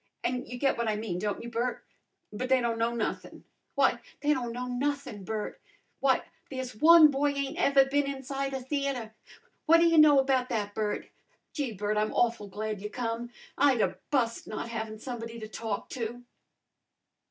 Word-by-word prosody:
An' 250 0 -1
you 250 - -6
get 270 -1 +1
what 235 - 0
I 215 - +1
mean, 210 -5 -3
don't 205 +2 -2
you, 235 - -6
Bert? 240 +2 -2 0.5
But 255 +5 -3
they 260 -1 +5
don't 235 -2 -1
know 230 +1 +2
nothin'. 225 - -4 0.3
Why, 270 -4 +3 0.2
they 295 +1 +3
don't 245 -4 -2
know 245 +2 -4
nothin', 250 -4 -2
Bert! 215 +2 -4 0.4
Why, 270 -1 +3 0.3
there's 260 -3 -5
one 315 +4 +8
boy 285 +1 +1
ain't 280 -1 -3
ever 275 -1 +5
been 285 +1 +1
inside 270 0 -3
a 265 - -3
theatre! 265 -4 -2 0.5
What 330 +1 +8
ta 335 - +4
you 330 -1 +5
know 300 -2 +8
about 265 -2 +2
that, 210 -4 -2
Bert? 210 -1 -2 0.5
Gee, 275 -7 -2
Bert, 210 +1 -1
I'm 215 0 0
awful 230 -3 +1
glad 210 +1 -4
you 210 - -4
come! 235 0 -3 0.3
I'd 270 -3 +4
'a' - - 0
bust 235 -5 0
not 215 +2 -5
havin' 220 -1 -4
somebody 230 0 -6
to 215 - -6
talk 220 -1 -4
to." 240 0 -5
245 Hz, 185 wpm, -29 LUFS, 220-275 Hz, 0.5 s, one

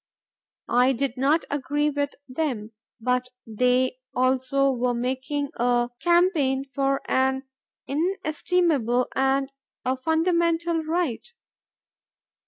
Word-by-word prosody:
I 250 +2 +4
did 265 0 -2
not 280 +5 +2
agree 290 +1 0
with 285 0 -2
them; 255 -6 -3 0.3
but 250 +2 0 0.2
they 250 +3 +1 0.2
also 260 +2 +2
were 250 -1 0
making 260 +4 -2
a 240 0 +1
campaign 340 -7 +2
for 275 -1 +1
an 265 0 +1 0.4
inestimable 310 - 0
and 270 +1 +1 0.3
a 255 +1 +1
fundamental 330 +3 +1
right. 325 - -2
270 Hz, 95 wpm, -25 LUFS, 250-315 Hz, 0.4 s, I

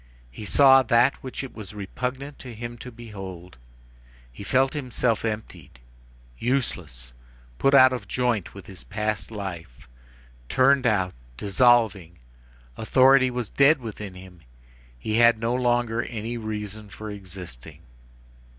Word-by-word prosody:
He 105 - -9
saw 135 +4 +6
that 120 +2 +3
which 130 +1 -6
it 135 - -8
was 105 -2 -9
repugnant 130 +8 -5
to 125 -3 -9
him 120 +1 -6
to 125 - -9
behold. 95 - -10 0.7
He - - -12
felt 130 +5 +2
himself 125 -5 -1
emptied, 110 - -6 0.6
useless, 80 - -3 0.5
put 135 0 +4
out 130 -1 +7
of 125 - -5
joint 120 -8 -1
with 100 -2 -10
his 95 -2 -11
past 105 +1 -3
life, 90 - -8 0.6
turned 135 0 +4
out, 95 -5 +1 0.2
dissolved. 100 -5 +2 0.6
Authority 130 +3 +5
was 125 -2 -4
dead 140 +3 +4
within 105 -5 -8
him. 90 -2 -13 0.6
He 110 - -2
had 115 -1 +6
no 115 +2 -1
longer 120 -2 +1
any 115 0 -5
reason 105 -2 -6
for 105 +3 -8
existing. 90 -10 -9
110 Hz, 130 wpm, -25 LUFS, 95-125 Hz, 0.7 s, out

